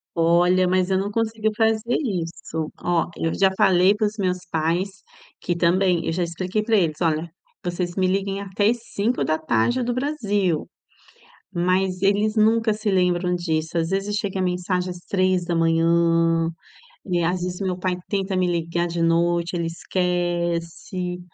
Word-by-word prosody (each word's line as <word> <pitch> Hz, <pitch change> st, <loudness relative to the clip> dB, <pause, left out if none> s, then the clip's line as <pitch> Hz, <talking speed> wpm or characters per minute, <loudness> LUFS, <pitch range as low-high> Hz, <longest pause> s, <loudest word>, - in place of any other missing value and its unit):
Olha, 175 Hz, +2 st, +3 dB
mas 185 Hz, 0 st, +1 dB
eu 190 Hz, -, +2 dB
não 200 Hz, +2 st, -2 dB
consegui 220 Hz, 0 st, 0 dB
fazer 225 Hz, +1 st, +1 dB
isso. 165 Hz, -, -3 dB
Ó, 175 Hz, -1 st, 0 dB
eu 165 Hz, -, -1 dB
já 195 Hz, -1 st, +3 dB
falei 185 Hz, +1 st, +4 dB
para 210 Hz, 0 st, +1 dB
os 210 Hz, +1 st, -7 dB
meus 185 Hz, -3 st, 0 dB
pais 165 Hz, +4 st, 0 dB, 0.5 s
que, 175 Hz, -, -2 dB
também 175 Hz, +1 st, +2 dB
eu -, -, +1 dB
já 175 Hz, +2 st, -1 dB
expliquei 185 Hz, +5 st, -2 dB
para 225 Hz, 0 st, +2 dB
eles: 160 Hz, -5 st, 0 dB
"Olha, 165 Hz, 0 st, 0 dB, 0.3 s
vocês 175 Hz, 0 st, -3 dB
me 185 Hz, -1 st, +2 dB
liguem 195 Hz, +1 st, -1 dB
até 200 Hz, +1 st, +1 dB
às 240 Hz, -, +1 dB, 0.2 s
17h 200 Hz, -, +1 dB
do 245 Hz, +1 st, -1 dB
Brasil", 205 Hz, -, -1 dB, 0.9 s
mas 185 Hz, +1 st, 0 dB
eles 205 Hz, +2 st, +2 dB
nunca 220 Hz, +1 st, +3 dB
se 210 Hz, 0 st, -2 dB
lembram 180 Hz, -1 st, +1 dB
disso. 165 Hz, -1 st, -2 dB
Às 165 Hz, 0 st, -1 dB
vezes 195 Hz, +2 st, -1 dB
chega 200 Hz, -2 st, -2 dB
a -, -, +1 dB
mensagem 180 Hz, 0 st, -1 dB
às 180 Hz, -, -7 dB
3h 165 Hz, -2 st, +2 dB, 0.6 s
e 175 Hz, -3 st, 0 dB
às 175 Hz, +2 st, 0 dB
vezes 180 Hz, +1 st, -4 dB
meu 185 Hz, -2 st, -1 dB
pai 185 Hz, 0 st, -1 dB
tenta 195 Hz, -1 st, -1 dB
me 185 Hz, -1 st, +2 dB
ligar 170 Hz, 0 st, -1 dB
de 170 Hz, 0 st, -3 dB
noite. 170 Hz, +1 st, +1 dB
Ele 170 Hz, -1 st, -1 dB
esquece. 175 Hz, 0 st, -2 dB
180 Hz, 155 wpm, -23 LUFS, 170-195 Hz, 0.9 s, falei